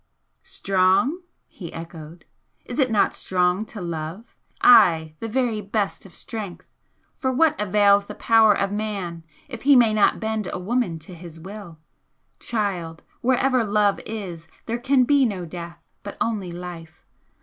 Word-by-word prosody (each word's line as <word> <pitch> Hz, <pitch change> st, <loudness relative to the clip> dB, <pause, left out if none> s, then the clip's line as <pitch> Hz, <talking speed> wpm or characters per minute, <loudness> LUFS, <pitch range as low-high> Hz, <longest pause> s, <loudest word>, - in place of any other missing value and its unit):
"Strong?" 195 Hz, -, +1 dB, 0.3 s
he 170 Hz, -5 st, -9 dB
echoed 165 Hz, 0 st, -10 dB, 0.4 s
"Is -, -, -5 dB
it 260 Hz, -2 st, +3 dB
not 215 Hz, -3 st, +2 dB
strong 180 Hz, +3 st, 0 dB
to 215 Hz, -, -9 dB
love? 170 Hz, +5 st, -6 dB, 0.3 s
ay, 170 Hz, -10 st, +6 dB
the 225 Hz, -, -4 dB
very 230 Hz, -2 st, 0 dB
best 200 Hz, -1 st, -2 dB
of 180 Hz, -, -17 dB
strength! 210 Hz, -6 st, -7 dB, 0.5 s
For 260 Hz, -, -2 dB
what 310 Hz, +4 st, +3 dB
avails 200 Hz, 0 st, +4 dB
the -, -, -8 dB
power 220 Hz, -2 st, +4 dB
of 200 Hz, 0 st, -1 dB
man 200 Hz, -6 st, -4 dB, 0.2 s
if 240 Hz, -5 st, -8 dB
he 285 Hz, 0 st, +5 dB
may 235 Hz, -3 st, +5 dB
not 215 Hz, -, +3 dB
bend 220 Hz, -3 st, -2 dB
a -, -, -3 dB
woman 195 Hz, -2 st, -1 dB
to 165 Hz, +3 st, -11 dB
his 170 Hz, -1 st, -11 dB
will? 190 Hz, -1 st, -10 dB, 0.6 s
Child, 185 Hz, -8 st, -3 dB, 0.2 s
wherever 255 Hz, 0 st, +2 dB
love 205 Hz, -1 st, +2 dB
is 185 Hz, -7 st, -6 dB, 0.2 s
there 235 Hz, +1 st, -3 dB
can 265 Hz, +1 st, +3 dB
be 280 Hz, +2 st, +4 dB
no 195 Hz, -7 st, -1 dB
death, 170 Hz, 0 st, -8 dB, 0.2 s
but 205 Hz, -, -8 dB
only 205 Hz, -6 st, -2 dB
life! 170 Hz, -2 st, -9 dB
205 Hz, 150 wpm, -23 LUFS, 175-225 Hz, 0.6 s, ay